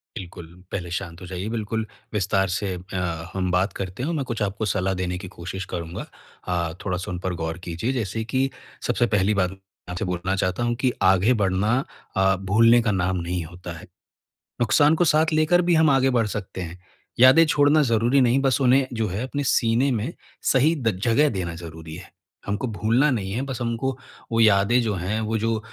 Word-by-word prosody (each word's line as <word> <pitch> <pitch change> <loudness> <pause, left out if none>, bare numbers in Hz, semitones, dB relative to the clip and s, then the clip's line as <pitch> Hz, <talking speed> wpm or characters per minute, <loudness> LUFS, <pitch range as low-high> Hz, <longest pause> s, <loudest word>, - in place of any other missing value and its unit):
बिल्कुल, 85 -4 -9 0.2
पहले 90 -3 -4
शांत 90 -1 -5
हो 90 - -9
जाइए। 95 +3 -5
बिल्कुल, 110 0 -2 0.3
विस्तार 95 -1 +1
से 95 +1 -2
अ, 90 -2 -4
हम 90 -1 -1
बात 90 +1 +1
करते 95 +4 -5
हैं 145 - -1
और - - -1
मैं 140 - -1
कुछ 115 -3 -3
आपको 100 +2 -2
सलाह 95 -1 0
देने 90 0 -3
की 95 -1 -8
कोशिश 95 +3 -5
करूँगा। 85 0 -5 0.4
अ, 85 -2 -1
थोड़ा-सा 95 0 -3
उन 90 - -4
पर 90 0 -3
गौर 80 0 -4
कीजिए। 85 +10 -2
जैसे 110 -2 -2
कि 130 +4 0 0.4
सबसे 120 - +2
पहली 105 -1 +2
बात 90 -2 +1
मैं 95 - -12 0.3
आपसे 90 +5 -3
बोलना 90 +1 -2
चाहता 95 +5 -1
हूँ 120 0 +1
कि 130 -2 +2
आगे 95 +6 +4
बढ़ना 100 +6 +2 0.4
अ, 95 0 +3
भूलने 115 +5 +4
का 110 - +1
नाम 95 0 0
नहीं 85 0 -3
होता 90 +1 -9
है। - - -12 0.8
नुकसान 145 +7 +4
को 175 - +2
साथ 155 +1 +3
लेकर 155 +3 +4
भी 175 - +4
हम 160 -1 +5
आगे 135 -1 +4
बढ़ 115 - +2
सकते 100 -2 -5
हैं। 85 +1 -7 0.4
यादें 130 +6 +8
छोड़ना 150 +1 +4
ज़रूरी 120 +3 +2
नहीं, 125 +2 +3
बस 135 -1 +2
उन्हें 130 +1 +4
जो 110 -2 -1
है, 100 +7 -3
अपने 145 +2 -3
सीने 125 +2 +2
में 120 +8 -2 0.3
सही 145 +5 +3
द 115 - -1
जगह 140 +6 +4
देना 85 -5 -3
ज़रूरी 80 -1 -9
है। 90 +1 -11 0.3
हमको 105 +5 -2
भूलना 115 +7 +2
नहीं 95 -5 -2
है, 120 +5 -2
बस 130 -2 -5
हमको 120 +3 -2 0.3
वो 115 - +1
यादें 110 +3 +4
जो 110 -3 -1
हैं, 95 +5 -2
वो 110 +1 -1
जो, 115 0 0
105 Hz, 205 wpm, -24 LUFS, 90-125 Hz, 0.8 s, यादें